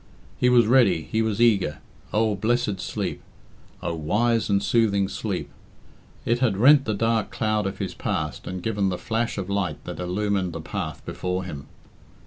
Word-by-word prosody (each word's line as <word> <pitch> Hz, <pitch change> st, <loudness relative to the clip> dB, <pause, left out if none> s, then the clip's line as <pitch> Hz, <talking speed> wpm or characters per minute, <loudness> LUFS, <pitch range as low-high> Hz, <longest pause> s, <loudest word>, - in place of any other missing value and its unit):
He 125 Hz, -, +4 dB
was 120 Hz, -2 st, +6 dB
ready, 110 Hz, -9 st, +4 dB
he 110 Hz, -, +2 dB
was 110 Hz, -1 st, -1 dB
eager. 100 Hz, -11 st, +3 dB, 0.3 s
Oh, 110 Hz, 0 st, +2 dB
blessed 105 Hz, -1 st, 0 dB
sleep! -, -, -3 dB, 0.6 s
Oh, -, -, -1 dB
wise 110 Hz, +10 st, +1 dB
and 100 Hz, -1 st, +2 dB
soothing 100 Hz, -4 st, +2 dB
sleep -, -, -3 dB, 0.8 s
I -, -, 0 dB
It 120 Hz, -, +2 dB
had 115 Hz, -7 st, +1 dB
rent 135 Hz, +5 st, +6 dB
the 110 Hz, -, -1 dB
dark 115 Hz, +1 st, +1 dB
cloud 110 Hz, -2 st, 0 dB
of 95 Hz, -, -5 dB
his -, -, -4 dB
past -, -, -3 dB
and 90 Hz, -1 st, -5 dB
given 100 Hz, -3 st, 0 dB
the 90 Hz, -, -2 dB
flash 115 Hz, +2 st, -2 dB
of 95 Hz, -2 st, -3 dB
light 95 Hz, -6 st, -2 dB
that -, -, -7 dB
illumined 95 Hz, 0 st, -1 dB
the 80 Hz, -, -5 dB
path 80 Hz, -4 st, -5 dB
before 90 Hz, +1 st, -3 dB
him. 75 Hz, -6 st, -7 dB
105 Hz, 175 wpm, -24 LUFS, 95-115 Hz, 0.8 s, was